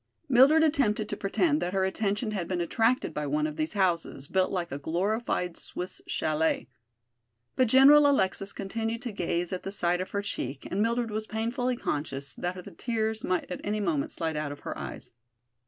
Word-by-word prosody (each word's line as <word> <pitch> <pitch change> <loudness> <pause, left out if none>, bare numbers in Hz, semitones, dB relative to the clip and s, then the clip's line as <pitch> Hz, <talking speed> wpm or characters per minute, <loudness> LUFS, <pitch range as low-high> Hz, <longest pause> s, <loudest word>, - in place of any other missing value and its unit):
Mildred 280 +5 +6
attempted 240 -9 +2
to - - -2
pretend 295 - +1
that 180 - -2
her 190 -1 +2
attention 210 +3 -1
had 190 -5 -3
been 180 -2 -1
attracted 225 +8 +1
by 150 -1 -2
one 150 +2 +1
of 155 -1 -3
these 155 +4 -2
houses, 175 -8 0
built 185 +4 +1
like 175 -3 -2
a 140 - -4
glorified 180 +3 -1
Swiss 180 +1 -6
chalet. 155 -2 0 0.9
But 255 - +3
General 285 +4 +7
Alexis 195 -6 +1
continued 225 +4 -3
to 245 - -3
gaze 175 -2 -2
at 185 - -3
the 195 - -5
side 180 -2 +1
of 185 - -5
her 200 0 -2
cheek 135 -8 -4
and 195 - 0
Mildred 230 0 0
was 215 +1 -3
painfully 240 +3 -1
conscious 140 - -3
that 180 +4 -4
the - - -9
tears 220 -2 -2
might 185 0 -1
at 180 - -4
any 210 +1 -1
moment 165 -8 0
slide 160 -1 -2
out 150 -1 -2
of 145 - -9
her - - -5
eyes. - - -7
195 Hz, 190 wpm, -28 LUFS, 170-225 Hz, 0.9 s, General